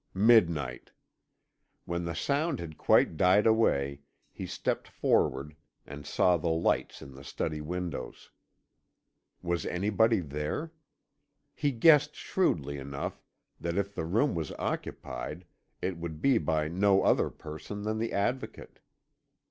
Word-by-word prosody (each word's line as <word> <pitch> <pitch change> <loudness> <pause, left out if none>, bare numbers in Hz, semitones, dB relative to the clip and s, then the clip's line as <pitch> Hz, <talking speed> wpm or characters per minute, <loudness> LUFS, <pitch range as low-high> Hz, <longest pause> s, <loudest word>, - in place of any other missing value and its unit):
Midnight. 85 - +3 0.9
When 85 0 -3
the 85 - -3
sound 145 0 0
had 80 -2 -7
quite 80 - +3
died 95 +5 +4
away, 70 -12 +2 0.3
he - - -7
stepped - - -2
forward, 75 +3 0 0.3
and 75 +1 -9
saw 90 -1 +3
the 85 +1 -2
lights 80 +1 0
in 70 - -11
the 65 +1 -12
study 75 +2 -3
windows. 85 -3 -5 1.1
Was 85 -1 -1
anybody 105 +4 +2
there? 75 - -4 0.8
He 145 - 0
guessed 150 +4 +5
shrewdly 70 - -1
enough 70 0 -5 0.4
that 85 +1 -3
if 100 0 -1
the 80 - -3
room 115 - +2
was 80 -4 -3
occupied 90 - -5 0.4
it 90 -1 -1
would 85 -2 -6
be 130 - +3
by 80 -5 0
no 95 +4 +3
other - - +3
person 80 +6 -8
than 110 +1 -2
the 115 +1 -2
Advocate. 120 +6 -3
85 Hz, 130 wpm, -29 LUFS, 75-110 Hz, 1.1 s, guessed